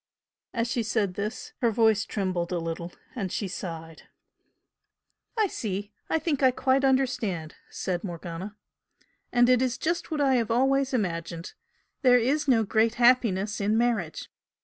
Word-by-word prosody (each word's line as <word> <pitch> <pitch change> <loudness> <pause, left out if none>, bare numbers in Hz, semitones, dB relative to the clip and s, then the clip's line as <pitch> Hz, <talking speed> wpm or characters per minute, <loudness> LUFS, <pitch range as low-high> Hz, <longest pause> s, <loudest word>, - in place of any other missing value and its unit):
As 230 0 -1
she 235 +1 -1
said 215 -3 0
this 205 +4 -5
her 235 - +4
voice 220 -2 +3
trembled 185 -4 -2
a 180 - 0
little 165 +1 -4 0.2
and 195 -7 -3
she 205 - -2
sighed. 165 -3 -7 1.3
"I 435 - +4
see! 205 - -4 0.2
I - - +2
think 310 -3 -1
I 260 - +6
quite 260 +1 +1
understand!" 235 - 0 0.2
said 180 -2 -3
Morgana 175 +2 -6 0.8
"And 245 0 +4
it 250 -1 +4
is 255 -2 0
just 340 +2 -2
what 310 -3 -2
I 270 -3 +3
have 230 -3 0
always 270 +3 +2
imagined 170 -7 -3 0.5
there 250 -3 +6
is 285 +5 +1
no 235 -4 +4
great 220 +2 +2
happiness 225 -5 +3
in 210 +2 +2
marriage. 225 -9 0
225 Hz, 150 wpm, -27 LUFS, 185-255 Hz, 1.3 s, I